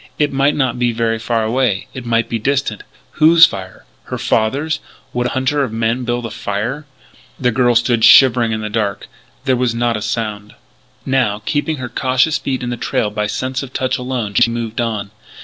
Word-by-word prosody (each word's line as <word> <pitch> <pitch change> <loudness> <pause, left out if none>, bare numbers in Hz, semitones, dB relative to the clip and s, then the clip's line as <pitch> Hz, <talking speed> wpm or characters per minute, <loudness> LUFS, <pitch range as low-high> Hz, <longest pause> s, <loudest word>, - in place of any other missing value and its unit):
It 145 -2 +1
might 140 +2 +2
not 125 -3 0
be 120 -1 +2
very 115 0 0
far 115 0 -1
away; 110 -3 0
it 125 -2 -7
might 115 0 +1
be 115 - -2
distant. 135 +4 -1 0.4
Whose 165 +1 +8
fire? 95 - -7 0.2
Her - - -5
father's? 140 +9 0 0.3
Would 125 0 0
a - - -4
hunter 135 +2 +1
of 130 - -3
men 115 +2 -1
build 120 0 -2
a 115 - -5
fire? 120 +9 -4 0.5
The 125 -2 +2
girl 120 0 +2
stood 115 -1 +2
shivering 120 -3 +6
in 110 0 -2
the 105 - -4
darkness. 105 -3 -2 0.4
There 130 - +3
was 125 -2 0
not 120 -1 0
a - - -6
sound. 105 -2 -4 0.5
Now, 120 -6 0
keeping 155 +2 -1
her 130 -2 -5
cautious 130 +5 +1
feet 130 -2 -3
in 120 - -3
the 120 - -3
trail 105 -2 -1
by 105 0 -2
sense 130 +4 -3
of 135 -2 -9
touch 130 0 -1
alone, 125 -5 -3
she 115 - +4
moved 115 0 -3
on. 105 -4 -3
120 Hz, 200 wpm, -17 LUFS, 110-130 Hz, 0.5 s, Whose